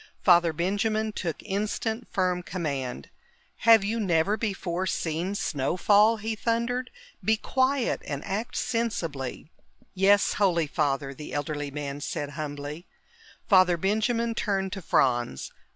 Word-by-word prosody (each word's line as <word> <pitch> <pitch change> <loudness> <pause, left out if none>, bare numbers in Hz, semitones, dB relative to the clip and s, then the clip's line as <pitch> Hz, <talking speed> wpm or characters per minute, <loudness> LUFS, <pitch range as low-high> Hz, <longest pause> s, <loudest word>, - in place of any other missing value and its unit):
Father 175 -2 +5
Benjamin 205 +6 0
took 170 -6 -4
instant, 215 +3 -2
firm 180 -2 0
command. 140 -9 -4 0.6
"Have 225 -3 +8
you 220 +3 -1
never 190 0 +2
before 190 -4 -2
seen 170 +4 -2
snow 145 -3 -1
fall?" 210 +4 +5
he 220 +1 -3
thundered. 235 +3 -1 0.3
"Be 220 0 +3
quiet 260 +3 0
and 140 -1 -4
act 205 +4 -3
sensibly!" 165 - -3 0.4
"Yes, 195 +2 +4
Holy 170 -5 +3
Father," 140 -2 -1
the 150 0 -9
elderly 145 0 -3
man 140 0 -5
said 145 0 -4
humbly. 145 +2 -6 0.6
Father 185 -4 +5
Benjamin 220 +5 0
turned 195 -4 -1
to 195 - -5
Franz. 120 - +1
185 Hz, 125 wpm, -27 LUFS, 150-215 Hz, 0.6 s, Have